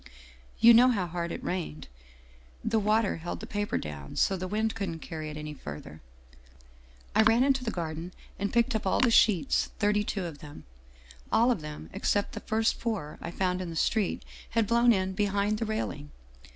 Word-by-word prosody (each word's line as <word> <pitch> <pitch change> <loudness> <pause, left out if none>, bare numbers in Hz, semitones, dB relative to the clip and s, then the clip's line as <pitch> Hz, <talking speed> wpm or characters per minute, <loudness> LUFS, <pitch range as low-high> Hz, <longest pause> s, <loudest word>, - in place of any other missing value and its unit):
You 235 +1 +8
know 240 +2 +7
how 205 -7 +1
hard 170 0 -4
it - - -6
rained. 160 - -4 0.8
The 225 0 +2
water 215 0 +2
held 165 +2 -5
the - - -7
paper 205 0 -2
down, 70 -2 -7
so 195 - +2
the 185 0 -4
wind 220 +3 0
couldn't 185 -5 -3
carry 155 -1 -6
it 150 - -7
any 150 0 -6
further. 75 - -9 1.1
I 215 - +5
ran 225 +3 +5
into 270 -1 +2
the 235 - -1
Garden 165 -2 -4 0.3
and 200 0 -1
picked 240 +2 +2
up 215 -3 -1
all - - +2
the 250 -3 +4
sheets, 185 -10 +3
thirty 210 0 +2
two 195 -3 -3
of 160 -4 -7
them. 150 -1 -11 0.7
All 235 +2 +4
of 225 - -1
them, 150 - -8
except 205 -1 0
the - - -6
first 220 +1 0
four 210 -10 -3
I - - -5
found 180 +1 -1
in 180 - -4
the 165 - -6
street, 205 +4 0 0.2
had 230 -1 +1
blown 235 +2 +4
in 190 -3 +1
behind 205 +1 0
the 225 - -1
rail 220 0 -1
ing. 145 +1 -10
195 Hz, 195 wpm, -29 LUFS, 165-220 Hz, 1.1 s, You